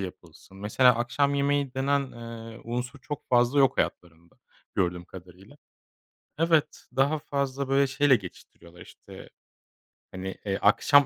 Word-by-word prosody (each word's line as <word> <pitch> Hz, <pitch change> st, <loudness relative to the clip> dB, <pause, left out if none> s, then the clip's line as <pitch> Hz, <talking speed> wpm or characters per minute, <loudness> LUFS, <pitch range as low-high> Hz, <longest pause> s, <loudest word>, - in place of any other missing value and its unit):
yapılsın. 95 Hz, 0 st, -10 dB
Mesela 120 Hz, +4 st, +4 dB
akşam 140 Hz, +4 st, 0 dB
yemeği 140 Hz, -1 st, 0 dB
denen, 140 Hz, 0 st, 0 dB
eee, 115 Hz, -1 st, -9 dB
unsur 125 Hz, +4 st, -4 dB
çok 145 Hz, +2 st, -7 dB
fazla 125 Hz, +3 st, +3 dB
yok 135 Hz, -3 st, +4 dB
hayatlarında 85 Hz, -1 st, -4 dB, 0.4 s
gördüğüm 90 Hz, -2 st, -1 dB
kadarıyla. 95 Hz, +7 st, -14 dB, 0.8 s
Evet, 165 Hz, -2 st, +1 dB
daha 140 Hz, +4 st, +2 dB
fazla, 140 Hz, -1 st, -3 dB
böyle, 135 Hz, +1 st, +3 dB
şeyle 135 Hz, 0 st, +4 dB
geçiştiriyorlar, 90 Hz, -3 st, -13 dB
işte, -, -, -13 dB, 0.8 s
hani, 95 Hz, 0 st, -6 dB
eee, 100 Hz, -1 st, -1 dB
akşam 140 Hz, +7 st, +5 dB
125 Hz, 125 wpm, -27 LUFS, 95-140 Hz, 0.8 s, akşam